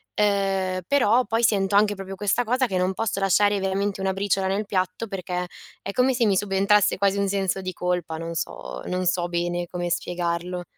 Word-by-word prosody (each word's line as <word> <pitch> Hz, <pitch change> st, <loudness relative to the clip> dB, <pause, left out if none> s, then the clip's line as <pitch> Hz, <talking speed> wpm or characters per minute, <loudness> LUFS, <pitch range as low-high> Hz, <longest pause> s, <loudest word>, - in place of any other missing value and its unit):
Ehm, 195 Hz, -2 st, +1 dB
però 250 Hz, -3 st, +4 dB
poi 225 Hz, +3 st, 0 dB
sento 200 Hz, -3 st, +2 dB
anche 205 Hz, 0 st, +4 dB
proprio 195 Hz, 0 st, -7 dB
questa 205 Hz, +5 st, +1 dB
cosa 250 Hz, +3 st, +1 dB
che 190 Hz, -4 st, -2 dB
non 185 Hz, +1 st, +1 dB
posso 215 Hz, -1 st, -2 dB
lasciare 200 Hz, +1 st, +3 dB
veramente 195 Hz, +1 st, -1 dB
una 190 Hz, 0 st, +1 dB
briciola 195 Hz, 0 st, 0 dB
nel 200 Hz, +2 st, -1 dB
piatto 185 Hz, +2 st, -2 dB
perché 180 Hz, -2 st, -3 dB, 0.4 s
è -, -, -4 dB
come 255 Hz, +5 st, +2 dB
se 240 Hz, -2 st, +2 dB
mi 200 Hz, -2 st, +3 dB
subentrasse 200 Hz, +1 st, +2 dB
quasi 200 Hz, 0 st, +2 dB
un 200 Hz, 0 st, +1 dB
senso 195 Hz, -1 st, -1 dB
di 185 Hz, 0 st, -4 dB
colpa, 175 Hz, -2 st, -2 dB
non 165 Hz, +1 st, -5 dB
so, 165 Hz, -, -5 dB
non 180 Hz, 0 st, -2 dB
so 175 Hz, 0 st, +1 dB
bene 175 Hz, 0 st, -2 dB
come 175 Hz, -1 st, -3 dB
spiegarlo. 175 Hz, +1 st, -2 dB
195 Hz, 195 wpm, -24 LUFS, 180-205 Hz, 0.4 s, però